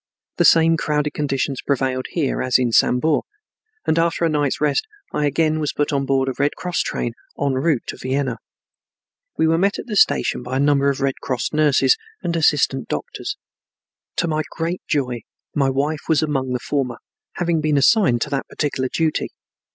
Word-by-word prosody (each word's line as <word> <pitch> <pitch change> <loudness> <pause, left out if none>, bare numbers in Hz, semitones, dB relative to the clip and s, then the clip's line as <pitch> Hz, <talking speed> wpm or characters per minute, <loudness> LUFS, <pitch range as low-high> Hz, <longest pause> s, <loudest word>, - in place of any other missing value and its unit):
The - - +3
same 165 0 +5
crowded 150 -1 -1
conditions 140 -2 -1
prevailed 130 -2 -1
here 150 -6 -1
as 130 -1 +3
in 125 -2 0
Sambor, 145 +7 +3 0.6
and 160 - +2
after 170 0 +1
a - - +2
night's 145 -3 0
rest 150 - +1 0.3
I 150 - +1
again 155 +2 +1
was 150 -2 -1
put 145 0 -1
on 140 -1 0
board 135 -1 +2
a 130 - -1
Red 145 +1 +1
Cross 180 -1 -3
train 120 - -2 0.3
en 140 -1 +1
route 135 -1 +1
to - - -6
Vienna. 130 -2 -1 1.0
We - - +3
were 165 +1 +3
met 200 +2 +2
at - - -6
the 215 - -4
station 195 - +3
by 125 +1 -3
a - - 0
number 140 0 +3
of 140 - -2
Red 135 -1 0
Cross 125 +1 -2
nurses 150 - +4 0.3
and 170 - -1
assistant 145 -5 +2
doctors. 75 - -4 0.8
To 170 - 0
my 155 -1 0
great 170 +2 -3
joy 125 -5 -1 0.3
my 135 -2 +2
wife 145 +3 -1
was 160 -1 +3
among 135 -4 -1
the 125 - -1
former, 125 -3 -2 0.4
having 170 -2 0
been 150 -1 +1
assigned 140 - +4
to 150 - -2
that 135 -1 -2
particular 130 -3 -2
duty. 160 -2 0
145 Hz, 185 wpm, -21 LUFS, 135-160 Hz, 1.0 s, same